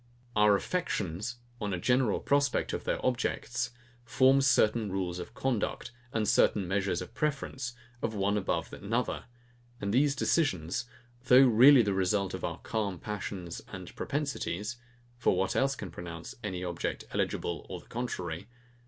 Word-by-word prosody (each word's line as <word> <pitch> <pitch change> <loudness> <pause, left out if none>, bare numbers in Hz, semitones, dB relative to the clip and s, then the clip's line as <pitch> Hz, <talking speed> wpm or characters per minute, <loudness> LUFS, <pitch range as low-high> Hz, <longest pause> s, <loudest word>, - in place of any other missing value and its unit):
Our 105 -1 +6
affections, 105 - -2 0.3
on 105 -3 -1
a - - -4
general 125 +1 +2
prospect 140 -1 +1
of - - -4
their - - -1
objects, 125 0 -1 0.3
form 130 +3 +4
certain 110 -5 +3
rules 90 -2 -2
of 110 - -8
conduct, 125 -2 -1 0.2
and 110 -2 0
certain 100 -2 +3
measures 95 -2 0
of 90 - -13
preference 135 -5 -2 0.3
of 110 -1 -2
one 100 +1 +1
above 100 -2 -1
another: 115 +5 -2 0.5
and 100 0 -2
these 140 +3 +4
decisions, 120 - +1 0.4
though 130 +1 +8
really 125 +2 +8
the 100 -2 0
result 95 +1 +1
of - - -5
our - - -2
calm 100 -4 -2
passions 95 -3 -5
and - - -8
propensities, 120 - -2 0.4
(for 105 - +3
what 95 +1 0
else 135 +1 +2
can 100 -9 -7
pronounce 85 0 -7
any 95 -3 -3
object 85 -1 -3
eligible - - -2
or - - -5
the - - -18
contrary?) 95 -7 -4
105 Hz, 150 wpm, -30 LUFS, 95-125 Hz, 0.5 s, though